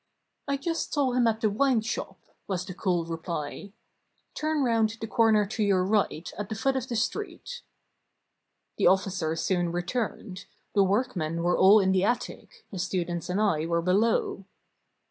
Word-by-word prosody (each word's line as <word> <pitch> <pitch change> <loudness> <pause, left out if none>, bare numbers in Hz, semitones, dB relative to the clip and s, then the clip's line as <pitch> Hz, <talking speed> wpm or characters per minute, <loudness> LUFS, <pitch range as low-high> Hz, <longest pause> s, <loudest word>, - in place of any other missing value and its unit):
"I 280 0 0
just 330 +4 -3
saw 280 -4 +1
him 245 -1 +2
at 225 0 0
the 215 - +3
wine 255 +1 +2
shop," 220 +1 -4 0.3
was 185 -2 -2
the 185 - -7
cool 180 -3 -1
reply. 165 +2 -5 0.6
"Turn 310 -1 -1
round 225 -2 +1
the - - -4
corner 220 -2 +3
to 220 +2 -4
your 190 -3 +2
right, 195 -4 0
at 205 - -4
the 220 - -3
foot 270 +6 0
of 260 -1 -2
the 240 - -3
street." 425 - -3 1.2
The - - +4
officer 185 -4 +1
soon 175 +1 0
returned; 190 +1 -4 0.3
the 200 - +4
workmen 185 -6 -1
were 175 +1 +2
all 200 +3 +7
in 190 -1 +2
the 190 -1 +2
attic, 440 - -3
the 190 - -6
students 175 -2 -2
and 185 +3 0
I 165 -7 +1
were 170 0 0
below. 195 +1 +1
200 Hz, 165 wpm, -27 LUFS, 180-230 Hz, 1.2 s, all